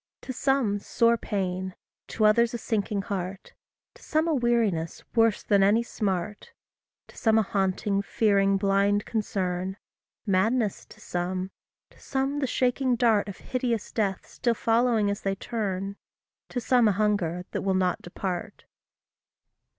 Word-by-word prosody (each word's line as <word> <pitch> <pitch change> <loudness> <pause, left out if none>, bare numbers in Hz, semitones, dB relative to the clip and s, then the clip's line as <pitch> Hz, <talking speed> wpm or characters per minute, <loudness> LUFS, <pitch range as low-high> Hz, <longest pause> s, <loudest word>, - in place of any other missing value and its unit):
To 260 - -6
some 255 -6 +1
sore 230 +3 +2
pain, 190 -4 -3 0.3
to 215 - 0
others 235 +3 +4
a - - -1
sinking 210 -3 -1
heart; 195 -2 -5 0.4
To - - -19
some 315 +1 0
a 325 - +2
weariness 230 - 0
worse 225 -3 +3
than 200 -1 +3
any 210 +4 +4
smart; 205 -3 -3 0.6
To - - -16
some 220 -1 +2
a 220 - +4
haunting, 195 0 0
fearing, 200 -2 +2
blind 200 +1 +2
concern; 190 -4 -2 0.5
Madness 215 +2 +1
to - - -16
some; 185 +2 -3 0.4
to - - -21
some 270 +1 -1
the 270 - 0
shaking 255 0 +1
dart 225 -4 +2
Of 195 - -8
hideous 245 -4 -2
death 200 -4 -1
still 235 -2 -1
following 225 -2 +2
as 200 - -4
they 195 0 -1
turn; 200 -2 -3 0.5
To 245 - -2
some 245 -1 +3
a 210 - +3
hunger 185 -4 0
that - - -2
will 195 -1 +1
not 185 -2 +1
depart. 180 +2 -5
205 Hz, 145 wpm, -27 LUFS, 195-235 Hz, 0.6 s, others